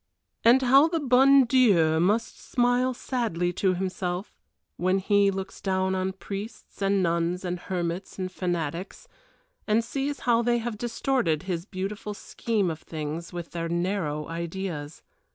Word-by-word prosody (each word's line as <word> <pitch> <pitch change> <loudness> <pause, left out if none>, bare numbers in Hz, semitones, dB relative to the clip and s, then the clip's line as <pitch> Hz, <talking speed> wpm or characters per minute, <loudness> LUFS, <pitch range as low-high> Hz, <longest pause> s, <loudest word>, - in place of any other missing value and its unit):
And 250 +3 +6
how 270 +5 +6
the 330 0 -1
bon 270 0 +6
Dieu 195 -11 +4
must 210 +6 +1
smile 245 +1 +1
sadly 180 -10 -1
to 185 +1 +1
Himself 185 +1 -3 0.4
when 185 +2 +1
He 200 +1 +3
looks 195 0 -5
down 190 -1 0
on 190 0 -1
priests 200 +3 -8
and 195 -1 +2
nuns 170 +2 0
and 180 0 -2
hermits 175 0 -4
and 185 -1 -3
fanatics, 175 -1 -3 0.6
and 220 +2 +3
sees 275 +3 -3
how 235 -1 +3
they 240 0 +2
have 230 -2 -4
distorted 240 - 0
His 180 -1 -3
beautiful 205 +2 -5
scheme 205 -4 -1
of 160 - -6
things 160 +1 -5
with 175 -1 -6
their 165 -1 -3
narrow 170 -4 -1
ideas. 165 -2 -5
190 Hz, 145 wpm, -26 LUFS, 175-230 Hz, 0.6 s, And